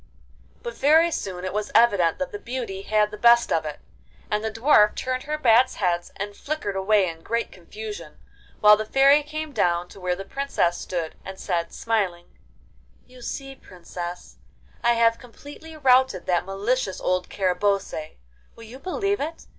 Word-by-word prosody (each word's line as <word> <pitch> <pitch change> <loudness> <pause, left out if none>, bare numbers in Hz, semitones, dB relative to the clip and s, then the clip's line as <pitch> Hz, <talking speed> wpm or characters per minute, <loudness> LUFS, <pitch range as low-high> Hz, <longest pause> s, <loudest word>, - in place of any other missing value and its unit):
But 480 0 -5
very 320 +4 +4
soon 185 - -4
it 185 - -4
was 210 0 -2
evident 200 -8 +4
that 275 - -4
the 205 - -6
Beauty 235 -4 -5
had 210 +1 +1
the 210 - -9
best 235 0 +5
of 160 -1 0
it, 150 -1 -6 0.5
and 210 +1 0
the 220 - -1
Dwarf 225 -2 +4
turned 255 0 -3
her 305 - -1
bats' 250 -2 +4
heads 175 -3 -1
and 205 +1 -5
flickered 285 -9 -4
away 195 0 +2
in 165 -1 -7
great 230 +6 -2
confusion, 185 -2 -9 0.4
while 210 0 +8
the 215 - -3
Fairy 275 +6 +5
came 310 +1 -6
down 175 -7 0
to - - -13
where 180 -1 -1
the 195 - -8
Princess 235 -9 -1
stood, 170 -3 -4
and 190 0 -9
said, 170 -2 -2
smiling, 190 -6 -2 0.7
'You 250 0 -16
see 270 +2 -6
Princess, 175 -5 -9 0.5
I 235 0 +4
have 230 -1 +3
completely 290 +6 -12
routed 260 - +3
that 175 -1 +1
malicious 200 +2 -1
old 185 0 -1
Carabosse. 190 -4 -1 0.4
Will 230 - -13
you 235 +4 -11
believe 395 +4 -1
it! 320 +3 -5
210 Hz, 170 wpm, -24 LUFS, 185-260 Hz, 0.7 s, while